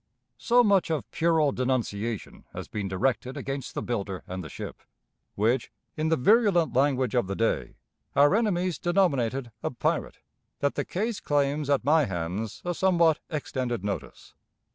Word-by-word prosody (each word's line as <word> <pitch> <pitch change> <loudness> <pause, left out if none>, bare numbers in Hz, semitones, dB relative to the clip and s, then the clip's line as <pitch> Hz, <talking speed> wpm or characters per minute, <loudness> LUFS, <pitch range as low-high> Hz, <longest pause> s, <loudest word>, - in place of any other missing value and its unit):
So 245 +1 +4
much 200 -6 +3
of 160 -3 -2
puerile 160 -3 +2
denunciation 120 -4 -2
has - - -6
been 105 -2 -4
directed 125 +6 -1
against 135 -2 -5
the - - -2
builder 100 -6 -3
and 95 0 -5
the 75 - -8
ship, - - -8 0.5
which, 115 +4 +1 0.2
in 155 +1 0
the 160 - +4
virulent 190 - +3
language 130 -2 +2
of 120 -6 +1
the 100 - -3
day, 115 +2 -1 0.4
our 145 +4 +5
enemies 185 -5 +1
denominated 135 - +1
a - - -1
"pirate," 125 - -1 0.4
that 140 0 0
the - - -2
case 215 +3 -2
claims 145 0 0
at 140 -3 +2
my 155 +1 +4
hands 95 +4 -4
a 175 - 0
somewhat 170 -4 +3
extended 130 - -3
notice. 100 -1 -5
135 Hz, 155 wpm, -27 LUFS, 115-165 Hz, 0.5 s, our